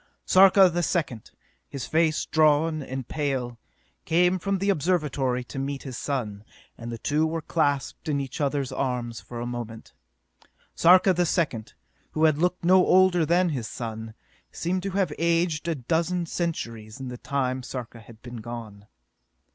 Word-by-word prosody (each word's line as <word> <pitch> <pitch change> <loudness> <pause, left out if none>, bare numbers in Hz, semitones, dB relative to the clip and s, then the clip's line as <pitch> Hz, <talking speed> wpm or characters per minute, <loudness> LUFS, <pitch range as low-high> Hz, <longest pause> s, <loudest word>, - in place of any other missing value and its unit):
Sarka 190 0 +7
the 175 0 -1
Second, 150 - -2 0.4
his 135 -3 -5
face 160 -1 +1
drawn 155 0 +3
and 130 -2 -6
pale, 130 -5 -2 0.4
came 180 +3 +2
from 200 +2 -1
the 200 +2 +1
Observatory 150 -7 0
to 135 - -7
meet 135 0 -4
his 130 -3 -7
son, 110 -8 -3 0.3
and 115 0 -7
the 115 - -5
two 150 +7 0
were 160 0 -3
clasped 145 0 -1
in 145 -2 +1
each 135 +2 -5
other's 140 -2 -1
arms 125 -3 -3
for 120 - -8
a 120 - -3
moment. 120 -2 -7 0.8
Sarka 185 +2 +6
the 175 0 +1
Second, 140 - -1 0.4
who 155 - 0
had 155 -2 +4
looked 180 +1 0
no 185 +1 +6
older 180 -4 +4
than 175 +2 +3
his 125 -8 -3
son, 110 -1 -6 0.4
seemed 180 +2 -2
to 195 - -3
have 185 -6 +1
aged 170 -1 +1
a 165 - 0
dozen 170 +6 -1
centuries 115 -10 -4
in 130 -1 -6
the 125 - -7
time 130 -2 -1
Sarka 125 -2 -7
had 115 0 -16
been 120 -1 -8
gone. 110 -3 -8
145 Hz, 165 wpm, -26 LUFS, 120-170 Hz, 0.8 s, Sarka